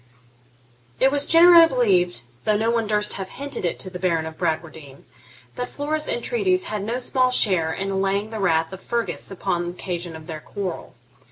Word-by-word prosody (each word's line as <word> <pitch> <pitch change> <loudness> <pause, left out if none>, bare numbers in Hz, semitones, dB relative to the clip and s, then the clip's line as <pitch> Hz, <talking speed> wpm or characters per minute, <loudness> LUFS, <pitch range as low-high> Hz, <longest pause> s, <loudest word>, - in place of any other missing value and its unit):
It 265 +1 +4
was 285 0 +2
generally 335 0 +8
believed, 190 - +1 0.2
though 215 -1 +2
no 225 +2 +1
one 230 -2 0
durst 210 0 +1
have 190 -1 -5
hinted 280 -7 -3
it 175 - -1
to 190 - -3
the 180 - -7
Baron 170 -3 0
of 160 0 -7
Bradwardine, 155 -4 -4 0.5
that 245 - -4
Flora's 305 +1 -2
entreaties 395 -7 0
had 215 -1 -3
no 230 +4 -2
small 255 0 +1
share 185 -10 +3
in 195 +3 -3
allaying 195 +2 -1
the 220 - -5
wrath 165 -3 +1
of 190 - -9
Fergus 235 +2 -3
upon 175 -2 -2
occasion 175 -1 -5
of 160 0 -11
their 160 -2 -6
quarrel. 190 -7 -6
200 Hz, 180 wpm, -22 LUFS, 175-250 Hz, 0.5 s, generally